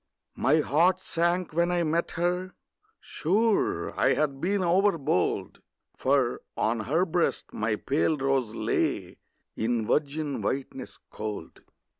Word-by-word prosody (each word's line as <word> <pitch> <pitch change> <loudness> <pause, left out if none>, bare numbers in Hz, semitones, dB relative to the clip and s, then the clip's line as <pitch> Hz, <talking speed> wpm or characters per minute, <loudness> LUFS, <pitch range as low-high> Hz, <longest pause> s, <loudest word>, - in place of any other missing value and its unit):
My 155 +3 +3
heart 175 +6 +3
sank 175 -1 0
when 170 +2 +2
I 175 -1 +1
met 165 +2 0
her: 180 +2 -1 0.4
sure 210 +6 0
I - - +4
had 140 -2 -1
been 195 +2 +1
overbold, 175 - +1 0.3
For 130 -2 +1 0.2
on 115 +1 +1
her 150 - +1
breast 175 -1 -1
my 110 0 0
pale 145 +6 0
rose 135 -5 0
lay - - -1 0.4
In 115 0 0
virgin 150 +2 -1
whiteness 135 0 -4
cold. 105 -6 -6
155 Hz, 120 wpm, -27 LUFS, 135-175 Hz, 0.4 s, I